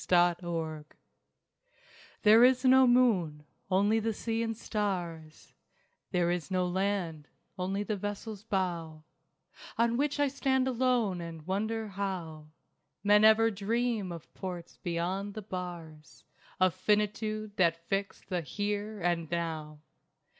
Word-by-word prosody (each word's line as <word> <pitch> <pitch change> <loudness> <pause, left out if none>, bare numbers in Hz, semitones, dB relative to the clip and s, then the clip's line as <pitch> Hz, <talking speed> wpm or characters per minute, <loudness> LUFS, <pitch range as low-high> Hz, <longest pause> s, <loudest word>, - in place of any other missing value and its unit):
CHARTINGS 170 -3 +1 1.3
There 220 +3 +8
is 255 +1 +4
no 260 0 +7
moon, 190 -12 +3 0.2
only 205 +4 +3
the 225 0 -1
sea 225 +2 -2
and 225 -1 -2
stars; 175 -9 -4 0.6
There 175 -1 +1
is 175 -1 -3
no 185 -1 +1
land, 180 -5 -2 0.3
only 190 +2 -2
the 210 0 -2
vessel's 205 +1 -5
bow 170 -6 -2 0.7
On 235 0 +2
which 290 +1 0
I 290 - +4
stand 265 -1 +1
alone 245 -7 +1
and 165 -2 -8
wonder 220 +4 -2
how 180 -6 -4 0.6
Men 210 +1 +5
ever 220 +1 +6
dream 220 -1 -1
of 170 -2 -9
ports 180 -3 -7
beyond 185 +4 -2
the 215 - -6
bars 170 -5 -8 0.4
Of 185 -2 +4
Finitude 210 0 -1
that 170 -2 +1
fix 195 0 -2
the 180 -2 -2
Here 205 +6 -3
and 170 -2 0
Now. 160 -3 -4
195 Hz, 125 wpm, -30 LUFS, 170-220 Hz, 1.3 s, There